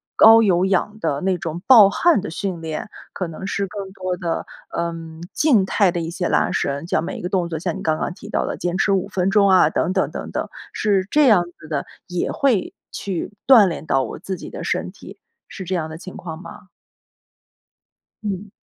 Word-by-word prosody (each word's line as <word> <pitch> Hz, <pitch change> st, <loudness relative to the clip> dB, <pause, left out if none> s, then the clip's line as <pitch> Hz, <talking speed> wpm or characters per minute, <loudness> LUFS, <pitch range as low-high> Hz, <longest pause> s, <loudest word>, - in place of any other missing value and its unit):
高 225 Hz, +1 st, +8 dB
有 185 Hz, -4 st, +3 dB
氧 195 Hz, +2 st, 0 dB
的 145 Hz, -7 st, -1 dB
那 190 Hz, -1 st, +1 dB
种 170 Hz, 0 st, -5 dB
爆 225 Hz, -7 st, +9 dB
汗 330 Hz, -, +3 dB
的 210 Hz, -, -5 dB
训 180 Hz, -1 st, -4 dB
练。 160 Hz, +5 st, -5 dB, 0.2 s
可 185 Hz, -, -4 dB
能 165 Hz, +3 st, -8 dB
是 200 Hz, 0 st, -2 dB
更 195 Hz, -1 st, -7 dB
多 185 Hz, -1 st, -3 dB
的， 170 Hz, -3 st, -3 dB, 0.3 s
嗯， 165 Hz, -1 st, -4 dB
静 245 Hz, -11 st, +3 dB
态 195 Hz, -1 st, +2 dB
的 175 Hz, -, -3 dB
一 165 Hz, -, -4 dB
些 175 Hz, +1 st, -2 dB
拉 -, -, +2 dB
伸。 140 Hz, +2 st, -2 dB
就 -, -, +1 dB
每 165 Hz, -, -5 dB
一 -, -, -7 dB
个 180 Hz, -, -3 dB
动 180 Hz, -3 st, 0 dB
作 160 Hz, -2 st, -3 dB
像 170 Hz, 0 st, -3 dB
你 -, -, -7 dB
刚 155 Hz, -1 st, +1 dB
刚 -, -, -2 dB
提 210 Hz, +3 st, -12 dB
到 -, -, 0 dB
的 -, -, -4 dB
坚 175 Hz, 0 st, -2 dB
持 200 Hz, -, +2 dB
5 195 Hz, -1 st, +1 dB
分 190 Hz, -1 st, 0 dB
钟 200 Hz, 0 st, +4 dB
啊， 185 Hz, -5 st, +6 dB
等 180 Hz, -, 0 dB
等 190 Hz, -, +1 dB
等 -, -, -6 dB
等， -, -, -3 dB, 0.2 s
是 195 Hz, -3 st, +1 dB
这 295 Hz, -2 st, +5 dB
样 210 Hz, -7 st, +5 dB, 0.2 s
子 155 Hz, -, -12 dB
的， 150 Hz, -3 st, -2 dB, 0.2 s
也 180 Hz, -1 st, -2 dB
会 255 Hz, -9 st, +1 dB, 0.2 s
去 190 Hz, -1 st, -4 dB, 0.2 s
锻 245 Hz, -6 st, +8 dB
炼 165 Hz, -2 st, -4 dB
到 135 Hz, -3 st, +2 dB
我 115 Hz, -, -6 dB
自 190 Hz, -, -4 dB
己 175 Hz, -, -9 dB
的 -, -, -7 dB
身 -, -, -2 dB
体， -, -, -13 dB, 0.3 s
是 195 Hz, -, -8 dB
这 185 Hz, +1 st, -4 dB
样 160 Hz, -3 st, -2 dB
的 160 Hz, -, -8 dB
情 185 Hz, +2 st, -10 dB
况 165 Hz, -1 st, -7 dB
吗？ 185 Hz, -, -12 dB, 1.6 s
嗯。 205 Hz, 0 st, -4 dB
185 Hz, 230 characters per minute, -21 LUFS, 165-200 Hz, 1.6 s, 爆